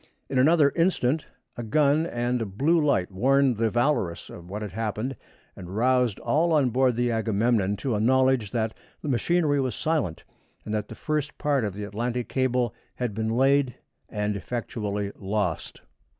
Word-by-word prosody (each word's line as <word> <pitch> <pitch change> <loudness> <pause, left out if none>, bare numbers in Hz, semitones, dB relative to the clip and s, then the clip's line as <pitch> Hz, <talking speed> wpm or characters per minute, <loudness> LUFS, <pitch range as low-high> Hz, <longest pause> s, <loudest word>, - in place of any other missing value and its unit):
In 130 - +1
another 150 +1 +5
instant 160 -5 +1 0.3
a - - -5
gun 150 +7 +2
and 120 -2 -1
a - - -1
blue 150 - +2
light 100 -11 +1
warned 130 +4 +3
the 115 0 +2
Valorous 120 - 0
of 85 +1 -11
what 105 +3 -4
had 105 - -5
happened, 110 +5 -3 0.4
and 90 +2 -8
roused 125 -2 +2
all 165 +3 +2
on 140 -5 +3
board 130 0 +2
the 120 0 +1
Agamemnon 110 -2 +1
to 125 +4 -2
a 105 - 0
knowledge 130 -1 +3
that 110 0 -1 0.3
the - - -4
machinery 145 +3 +2
was 130 -2 -2
silent, 150 - -1 0.4
and 110 - -4
that 105 -1 -2
the 115 - -9
first 150 +3 -2
part 145 -4 +1
of 100 -3 -3
the 105 - -5
Atlantic 120 +4 -3
cable 125 -3 0 0.2
had 120 -4 -2
been 110 +1 -2
laid 135 +2 +2 0.3
and 105 0 -2
effectually 105 -2 -3
lost. 100 -4 -2
120 Hz, 170 wpm, -26 LUFS, 105-135 Hz, 0.4 s, another